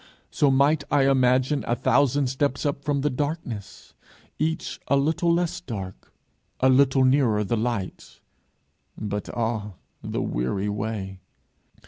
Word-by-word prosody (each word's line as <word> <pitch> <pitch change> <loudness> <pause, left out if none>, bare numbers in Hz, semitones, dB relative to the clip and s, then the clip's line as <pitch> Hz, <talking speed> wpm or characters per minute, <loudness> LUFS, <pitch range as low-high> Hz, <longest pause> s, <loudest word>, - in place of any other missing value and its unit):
So 145 - +3
might 140 +3 +3
I 140 -2 +3
imagine 130 +1 +2
a 120 - +1
thousand 135 +2 +2
steps 135 +2 -1
up 140 -1 -2
from 145 -2 0
the 150 - +1
darkness, 125 - -5 0.5
each 160 +2 -2
a - - +3
little 160 +5 +1
less 175 +1 0
dark, 95 - -7 0.5
a 130 - +4
little 135 0 +4
nearer 130 -5 +3
the 105 +3 -1
light 110 -4 -4 0.8
but, 105 -1 -4
ah, 110 -3 -2 0.3
the - - -3
weary 95 +12 -2
way! 100 -2 -4
130 Hz, 130 wpm, -25 LUFS, 110-145 Hz, 0.8 s, a